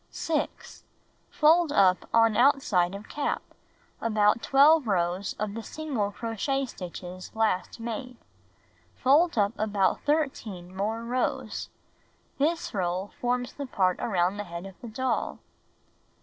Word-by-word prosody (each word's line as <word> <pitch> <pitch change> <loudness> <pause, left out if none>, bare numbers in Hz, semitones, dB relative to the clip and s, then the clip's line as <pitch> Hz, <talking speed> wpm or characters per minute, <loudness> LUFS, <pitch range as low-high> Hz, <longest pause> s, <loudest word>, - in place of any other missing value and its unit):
6. 310 -2 -3 0.5
Fold 320 +1 +4
up 185 -9 +3
on 225 -1 +4
outside 230 -9 +3
of 200 +2 -9
cap, 290 - -2 0.6
about 215 0 +3
12 285 0 +5
rows 180 0 0
of 210 -1 -4
the 230 - -5
single 265 -6 -3
crochet 235 +6 -2
stitches 180 -4 -8
last 220 -1 0
made. 235 +2 -5 0.8
Fold 295 +4 +3
up 205 0 +2
about 205 -3 +1
13 225 - -2
more 220 +4 -2
rows. 250 +2 -2 0.7
This 320 +4 0
roll 185 0 -1
forms 245 0 -1
the 280 -1 -6
part 185 -6 +1
around 185 -2 0
the 205 - -4
head 170 +1 -7
of 195 - -9
the 240 - -7
doll. 255 +4 -2
225 Hz, 125 wpm, -27 LUFS, 195-270 Hz, 0.8 s, 12